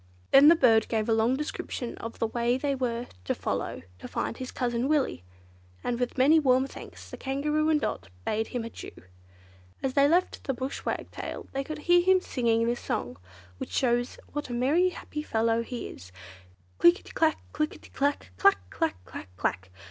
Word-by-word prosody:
Then 275 +2 +8
the 330 - +9
bird 225 -7 +4
gave 220 -2 -1
a 225 - +3
long 225 +3 +3
description 270 -4 -4
of 230 0 -7
the - - 0
way 235 +2 0
they 280 +1 0
were 245 -2 -2 0.2
to - - -1
follow - - -3 0.2
to - - -8
find - - -3
his 255 -1 -5
cousin 240 0 -1
Willy, 290 - +1 0.6
and 240 -1 -1
with 245 +1 -2
many 290 +5 +6
warm 260 -3 +3
thanks - - -10
the - - -7
Kangaroo 300 +3 0
and 310 -1 +4
Dot 95 - -3 0.2
bade 220 +1 0
him 245 -2 -3
adieu. 230 - -8 0.9
As 265 - 0
they 280 0 +5
left 355 +3 +1
the 270 - -1
Bush 260 +2 -5
Wagtail - - -4
they 275 0 -2
could 310 +3 -6
hear 350 0 +6
him 375 +1 +5
singing 230 -8 +1
this 240 +1 0
song, 120 +1 -3 0.4
which - - -5
shows 245 -1 +1 0.2
what 295 -2 -4
a - - -4
merry, 290 +10 +3
happy 300 -4 -6
fellow 230 -4 +1
he 240 +1 -5
is: 90 +1 -12 0.7
Click 175 0 +7
i - - -15
ti, - - -12 0.4
click 305 0 -1
i - - -11
ti - - -17
clack! 280 - -1
Clack! 90 +1 +3
clack! 160 -9 0
clack! - - -8
clack! 95 +1 -2
250 Hz, 195 wpm, -28 LUFS, 230-290 Hz, 0.9 s, the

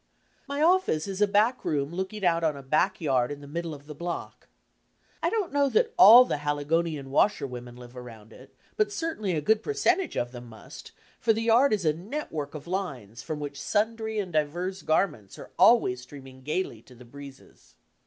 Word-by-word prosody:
My 285 +2 -1
office 340 - +2
is 195 0 -5
a 210 - +5
back 215 +5 +2
room 145 +1 -2
looking 190 +2 -4
out 170 -1 +2
on 155 -3 0
a 140 - -10
back 155 +8 +1
yard 130 -6 +1
in 145 - -6
the 145 - -12
middle 170 +3 -4
of 145 -2 -10
the 150 - -9
block. 170 +3 -6 0.7
I - - +1
don't 415 -9 -2
know 285 -1 +2
that 455 - +1
all 230 +7 +9
the 250 - -2
HaligcMiian 145 0 -2
washerwomen 125 -7 -1
live 125 0 -13
around 115 -3 -11
it, - - -16 0.3
but 425 -2 +1
certainly 320 - -3
a 155 - -1
good 220 +8 +2
percentage 390 - 0
of 120 0 -2
them 120 -1 -10
must, 110 -1 -12 0.3
for 225 - +3
the 225 +1 -2
yard 235 +5 +4
is 205 -5 0
a 155 - +3
network 165 - -6
of 150 - -8
lines 135 - -5
from 155 -1 -5
which 145 -1 -6
sundry 220 +1 -1
and 190 -5 -3
divers 175 +5 -2
garments 150 - -1
are - - -11
always 125 - +5
streaming 130 0 -13
gaily 150 -5 -3
to 125 - -18
the 125 +1 -15
breezes. 140 +2 -14
160 Hz, 195 wpm, -27 LUFS, 140-215 Hz, 0.7 s, all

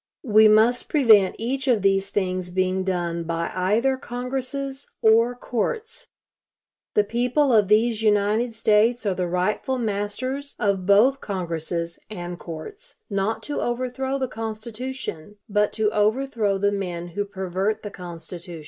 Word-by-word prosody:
We 215 -2 +6
must 220 +3 +4
prevent 220 -10 +5
each 265 +4 -2
of 230 -6 +3
these 195 0 +2
things 185 -2 -2
being 185 +1 0
done 175 -2 -2
by 165 0 -2
either 220 +9 +1
congresses 265 +2 -4
or 230 +2 +5
courts. 435 - -3 0.9
The 210 - +5
people 245 +5 +1
of 210 -3 +5
these 220 +2 +3
United 215 +2 +2
States 225 +2 +3
are 200 - +2
the 180 -1 -2
rightful 185 +9 -1
masters 245 +6 -3
of 195 -4 0
both 240 +7 +5
congresses 170 -3 -3
and 175 -4 -6
courts, 160 -2 -9 0.2
not 200 +3 -1
to 290 - -3
overthrow 255 +2 -2
the 260 -1 -1
Constitution, 225 -4 -6
but 210 -1 +1
to 215 -1 +1
overthrow 215 -1 +1
the 205 +1 +1
men 175 -3 -4
who 205 +4 -2
pervert 195 +2 -2
the 205 - -6
Constitution. 175 -1 -8
210 Hz, 140 wpm, -24 LUFS, 185-245 Hz, 0.9 s, We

